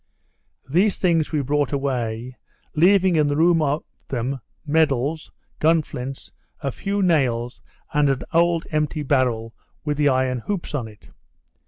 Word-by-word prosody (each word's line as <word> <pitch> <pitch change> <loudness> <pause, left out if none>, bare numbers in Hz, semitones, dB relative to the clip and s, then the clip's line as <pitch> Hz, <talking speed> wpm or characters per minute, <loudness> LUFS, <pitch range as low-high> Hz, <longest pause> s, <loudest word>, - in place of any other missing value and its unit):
Those 185 +9 +2
things 165 -4 +1
we 150 -3 0
brought 145 +1 0
away, 125 -3 -2 0.4
leaving 185 +2 +4
in 150 -1 +3
the 145 - 0
room 165 0 +4
of 145 +1 0 0.2
them 130 +2 -2 0.3
medals, 155 0 +1 0.3
gun 160 0 +4
flints, 135 -1 -7 0.3
a 140 -3 -2
few 200 +7 -2
nails, 125 -8 +1 0.3
and 150 -1 +3
an 135 -1 0
old 170 0 +3
empty 150 0 -1
barrel 125 -5 0 0.3
with 150 -1 -1
the 145 -1 +4
iron 130 -1 +1
hoops 190 - -4
on 130 -6 -2
it. 105 -1 -16
145 Hz, 145 wpm, -22 LUFS, 130-160 Hz, 0.4 s, leaving